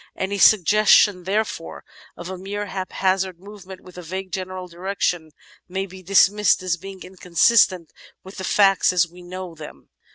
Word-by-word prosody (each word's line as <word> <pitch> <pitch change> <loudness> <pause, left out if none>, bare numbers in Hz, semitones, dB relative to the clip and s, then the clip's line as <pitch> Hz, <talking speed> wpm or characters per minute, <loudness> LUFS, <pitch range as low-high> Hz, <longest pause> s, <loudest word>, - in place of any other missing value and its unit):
Any 200 +1 -3
suggestion, 205 -1 +4
therefore, 200 -4 -3 0.3
of 175 - -8
a 190 - -6
mere 200 +3 -5
haphazard 190 -1 -2
movement 195 -1 -12
with 180 -1 -13
a - - -7
vague 185 +3 -7
general 185 0 -6
direction 175 -2 -3 0.4
may 190 +2 -3
be 190 0 -13
dismissed 195 +1 +3
as 180 -2 0
being 190 +2 -11
inconsistent 185 0 +1 0.3
with 190 +2 -12
the 190 - -6
facts 195 -1 +3
as 175 -1 +2
we 175 +2 -16
know 180 0 -8
them. 155 -2 -13
185 Hz, 155 wpm, -21 LUFS, 180-195 Hz, 0.4 s, suggestion